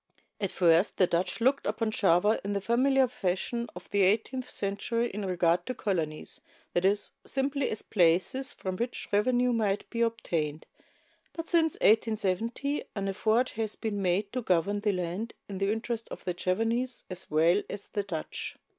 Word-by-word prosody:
At 195 - 0
first 170 +1 +3
the 185 - +5
Dutch 175 +4 -1
looked 265 +4 +2
upon 225 -2 0
Java 200 +2 +3
in 200 +1 -2
the 200 - 0
familiar 260 +5 +3
fashion 235 +1 -2
of 180 - -9
the 200 - +2
eighteenth 225 +7 +1
century 220 +4 -1
in 205 +1 -4
regard 175 -2 +2
to 255 - -2
colonies, 165 -8 -3 0.3
that 175 +1 +1
is, 205 +1 +2
simply 275 0 0
as 215 - -4
places 185 - +2
from 185 -1 -5
which 240 +3 -3
revenue 245 +4 +3
might 205 -3 0
be 235 - -2
obtained; 165 -10 -1 0.7
but 330 0 -5
since 325 -3 +3
1870 225 +5 +1
an 195 -1 -2
effort 220 +5 +2
has 220 -1 -3
been 210 -3 -3
made 195 +2 0
to 255 - -1
govern 195 0 +1
the 205 0 +1
land 180 +4 -3
in 195 -2 -6
the 195 +1 +1
interest 230 +1 -3
of - - -8
the 180 - -1
Javanese 225 +8 -1
as 180 - -6
well 165 +6 +4
as 200 0 -5
the 205 - -2
Dutch. 180 -6 -5
205 Hz, 170 wpm, -29 LUFS, 185-235 Hz, 0.7 s, the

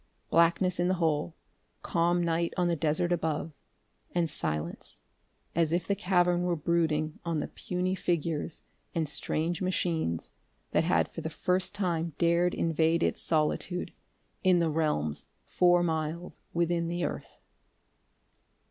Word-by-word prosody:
Blackness 170 +2 +3
in 175 - +2
the 185 - +2
hole, 160 -1 0 0.5
calm 175 +1 +2
night 170 0 0
on 180 -1 +2
the 170 - +2
desert 160 +2 +1
above 160 -2 -1 0.6
and 170 -1 +2
silence, 75 +2 -3 0.5
as 165 -1 +2
if 170 0 +1
the 200 - +1
cavern 180 -2 +2
were 180 -1 +1
brooding 155 -1 0
on 170 -3 -1
the - - -2
puny 180 +1 -2
figures 165 -3 -2 0.3
and 160 -2 +1
strange 160 +4 -1
machines 165 - -1 0.4
that - - +2
had - - +3
for - - -6
the - - -3
first 185 +1 0
time 170 -5 -1
dared 170 +1 +3
invade 165 +1 +2
its - - 0
solitude, 165 +3 0 0.5
in 185 -2 +5
the 165 -2 +2
realms 150 - 0 0.2
four 175 -1 +4
miles 160 +1 -2
within 170 0 +1
the 175 +1 -1
earth.... - - -6
170 Hz, 140 wpm, -29 LUFS, 160-175 Hz, 0.6 s, in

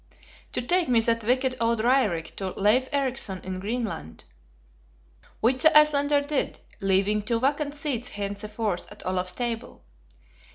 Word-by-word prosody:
"To 250 - -1
take 350 +5 +2
me 240 -2 +4
that 230 0 0
wicked 255 +2 +1
old 230 -1 +1
Raerik 220 -9 +1
to 190 -2 -4
Leif 225 +6 +3
Ericson 260 -9 0
in 185 0 -5
Greenland." 205 - -4 1.2
Which 255 +3 +2
the 315 -1 +7
Icelander 290 -1 +4
did; 285 0 -2 0.2
leaving 195 +1 +2
two 230 +2 -1
vacant 285 +3 0
seats 275 -5 -2
henceforth 205 0 -4
at 205 - -12
Olaf's 185 0 -1
table. 235 +1 -5
230 Hz, 135 wpm, -25 LUFS, 200-270 Hz, 1.2 s, the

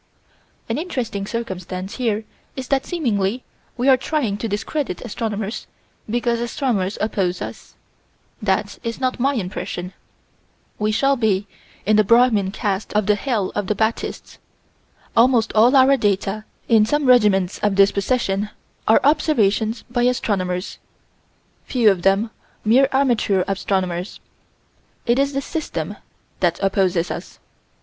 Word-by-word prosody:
An - - -1
interesting 240 - -3
circumstance 190 -4 -5
here 220 -4 -1 0.3
is 260 -1 -6
that 275 -1 +1
seemingly 235 - -1 0.3
we 250 +2 0
are 265 -1 +7
trying 255 -6 -1
to 225 - -3
discredit 220 +2 -3
astronomers 215 -1 -4 0.4
because 235 +1 0
astronomers 235 -5 -1
oppose 190 -4 -1
us - - -8 0.7
that's 200 0 -1 0.2
not 255 -1 -1
my 275 +3 +2
impression. 180 -3 -4 0.9
We 210 0 +1
shall 275 +5 +2
be 210 -4 +1 0.4
in 215 +1 +4
the 215 - +6
Brahmin 230 -3 +4
caste 200 -1 -3
of 210 -1 +2
the 210 - +4
hell 210 -3 -1
of 205 -2 -2
the 210 - 0
Baptists. 220 +2 -2 0.8
Almost 235 -1 +4
all 235 +5 +5
our 270 +1 +6
data, 205 -1 -1 0.2
in 225 -2 +5
some 295 +6 +1
regiments 210 -7 +4
of 205 -2 +1
this 195 0 +5
procession, 205 -1 0 0.4
are 220 - +5
observations 230 -7 +2
by 245 0 -2
astronomers, 190 -7 -1 0.9
few 235 -5 +4
of 185 -3 -2
them 195 +4 +2 0.3
mere 255 +5 +5
amateur 240 -8 +2
astronomers. 190 -2 -2 0.9
It 240 +2 +2
is 280 +1 +1
the 275 - -1
System 205 - -4 0.4
that 175 -2 +1
opposes 190 -3 +1
us. - - -7
215 Hz, 130 wpm, -21 LUFS, 195-250 Hz, 0.9 s, are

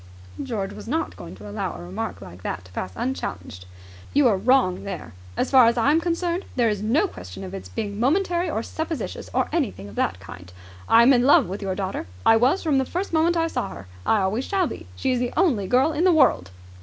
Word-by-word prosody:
George 210 -7 -3
was - - -10
not 320 +6 -2
going - - -9
to 100 +2 -11
allow 100 - -4
a 85 - -9
remark 90 +2 -5
like 90 -1 -11
that 90 0 -4
to 90 - -16
pass 95 0 -4
unchallenged. 90 - -5 0.5
"You 285 -2 +6
are 210 - +3
wrong 195 -3 +2
there. 200 - -6 0.2
As - - 0
far 255 -4 +7
as 235 - +2
I 240 +5 +3
am 320 +2 +3
concerned, 345 +1 -1
there 240 -3 +3
is 205 -2 -2
no 255 - +2
question 90 - -9
of 95 - -7
its 95 -1 -7
being 205 - -4
momentary 345 - +1
or 225 -7 -2
supposititious 320 +2 -5
or - - +1
anything 220 - -2
of 100 - -12
that 90 - 0
kind. 90 -1 -11 0.4
I 230 - +7
am 265 +3 +6
in 245 - +4
love 290 - +6
with 190 +3 -6
your 190 -2 -2
daughter. 190 - -4 0.2
I 225 - +7
was 255 +11 +3
from 295 -5 +2
the - - +2
first 360 +6 -4
moment 335 +2 +3
I 330 - +2
saw 330 - -2
her. 85 +2 -10 0.2
I 215 - +2
always 210 +7 -1
shall 385 -2 +1
be. 290 - -7
She 260 - -1
is 250 - +1
the 245 0 -2
only 250 - +2
girl 265 +8 +3
in 315 - 0
the 370 - +5
world!" 260 - +3
235 Hz, 235 wpm, -24 LUFS, -, 0.5 s, far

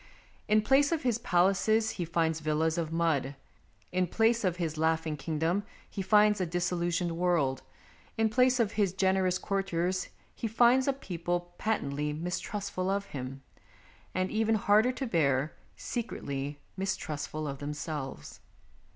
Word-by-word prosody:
In 215 0 +4
place 275 +6 +4
of 325 -3 0
his 240 -3 +1
palaces 215 +1 +2
he 175 - -3
finds 165 -1 0
villas 160 +2 0
of 160 -2 -2
mud; 160 -5 0 0.6
in 180 0 +1
place 225 +5 +2
of 185 -3 +1
his 165 -3 -2
laughing 160 0 0
kingdom 160 +6 -1 0.3
he 200 - -5
finds 210 +1 +4
a 180 - 0
disillusioned 175 0 0
world; 165 -7 +1 0.6
in 225 0 +3
place 250 +3 +3
of 220 -3 +2
his 200 -5 +1
generous 190 -1 +2
courtiers 185 -2 -1 0.2
he 230 - -3
finds 240 +4 +4
a 275 - +3
people 175 -6 -3
patently 150 -9 -1
mistrustful 185 +3 -3
of 200 +1 0
him, 135 0 -6 0.7
and, 185 0 0
even 220 0 +2
harder 215 +3 +4
to 265 +1 -4
bear, 150 - +1 0.2
secretly 145 - -4 0.2
mistrustful 155 -5 -3
of 140 -1 -5
themselves. 145 - -5
180 Hz, 140 wpm, -30 LUFS, 155-210 Hz, 0.7 s, In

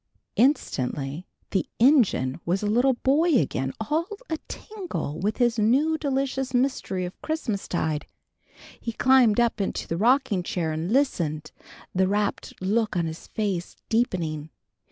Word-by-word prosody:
_" - - -56 0.3
Instantly 145 - 0 0.2
the 190 - 0
engine 220 - +4
was 185 +4 0
a - - 0
little 245 +5 +3
boy 295 +6 +3
again 135 - 0
all 305 +10 0 0.2
a 320 - -1
tingle 370 - -5
with 205 +4 0
this 240 -2 +2
new 270 +9 +3
delicious 270 -3 -1
mystery 245 -8 0
of 180 - -9
Christmastide. 195 - -2 0.7
He 230 - -4
climbed 250 -3 +5
up 235 -3 +2
into 195 - -2
the 165 - -2
rocking 230 -2 +3
chair 175 -4 -2
and 160 +5 -3
listened, 170 - 0 0.4
the 185 0 +2
rapt 205 +1 -1
look 215 +1 +1
on 170 - +1
his 160 0 -6
face 195 -5 -2
deepening. 165 -10 0
215 Hz, 140 wpm, -25 LUFS, 175-265 Hz, 0.7 s, climbed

